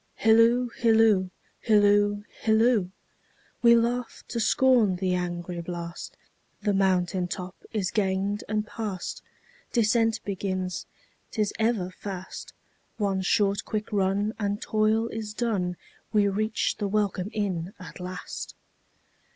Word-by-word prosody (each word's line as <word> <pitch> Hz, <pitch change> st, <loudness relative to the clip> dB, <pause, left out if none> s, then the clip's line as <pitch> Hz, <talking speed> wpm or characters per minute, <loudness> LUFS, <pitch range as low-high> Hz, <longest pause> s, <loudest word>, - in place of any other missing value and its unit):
Hilloo, 230 Hz, +3 st, +4 dB
hilloo, 220 Hz, -5 st, +4 dB, 0.3 s
hilloo, 205 Hz, -1 st, +4 dB, 0.2 s
hilloo! 220 Hz, -3 st, +3 dB, 0.7 s
We 235 Hz, -1 st, +7 dB
laugh 235 Hz, +1 st, -1 dB
to 235 Hz, -, -2 dB
scorn 230 Hz, -4 st, +4 dB
the 185 Hz, 0 st, 0 dB
angry 175 Hz, -1 st, -3 dB
blast, 170 Hz, 0 st, -7 dB, 0.5 s
The 205 Hz, -, +2 dB
mountain 185 Hz, -2 st, +1 dB
top 180 Hz, 0 st, -6 dB, 0.2 s
is 195 Hz, -4 st, -1 dB
gained 200 Hz, -1 st, 0 dB
and 215 Hz, 0 st, 0 dB
past. 210 Hz, -4 st, -5 dB, 0.5 s
Descent 225 Hz, -1 st, +2 dB
begins, 185 Hz, -2 st, -3 dB, 0.4 s
't -, -, -8 dB
is 210 Hz, -2 st, +1 dB
ever 220 Hz, -5 st, +1 dB
fast—One 195 Hz, +1 st, -6 dB
short 200 Hz, +1 st, +2 dB
quick 215 Hz, 0 st, -4 dB
run, 200 Hz, +2 st, +1 dB
and 205 Hz, -1 st, -1 dB
toil 220 Hz, -1 st, +1 dB
is 215 Hz, -1 st, -5 dB
done, 195 Hz, -7 st, -1 dB, 0.3 s
We 210 Hz, -2 st, +3 dB
reach 215 Hz, +3 st, 0 dB
the 205 Hz, -, 0 dB
welcome 200 Hz, -2 st, 0 dB
inn 190 Hz, -4 st, -2 dB
at 185 Hz, -, -10 dB
last. 180 Hz, -1 st, -6 dB
205 Hz, 120 wpm, -27 LUFS, 185-220 Hz, 0.7 s, We